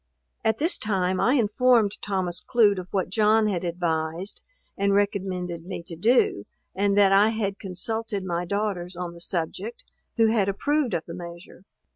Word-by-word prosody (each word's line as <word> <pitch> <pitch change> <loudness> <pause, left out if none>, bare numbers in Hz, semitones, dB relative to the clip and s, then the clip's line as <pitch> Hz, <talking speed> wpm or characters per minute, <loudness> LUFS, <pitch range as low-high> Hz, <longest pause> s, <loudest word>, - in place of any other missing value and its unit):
At 220 0 +2
this 325 +4 0
time 190 -3 0
I 255 - +3
informed 230 -2 +3
Thomas 185 -3 -2
Clute 210 -5 +3
of 180 - -7
what 185 -2 -1
John 215 +1 +4
had 190 -4 -1
advised, 170 +1 -2 0.3
and 200 0 +1
recommended 185 -4 -1
me 185 -3 -5
to 170 - -8
do, 180 - +2 0.3
and 200 +1 +1
that 200 -1 +6
I 200 +2 +6
had 210 -3 -2
consulted 205 +2 -3
my 175 -1 -1
daughters 190 -2 -2
on 175 -1 -5
the 170 - -10
subject, 190 - -4 0.3
who 225 -1 +5
had 205 -4 +2
approved 280 +3 0
of 160 - -3
the 170 - -8
measure. 175 +1 -10
195 Hz, 165 wpm, -25 LUFS, 175-215 Hz, 0.3 s, that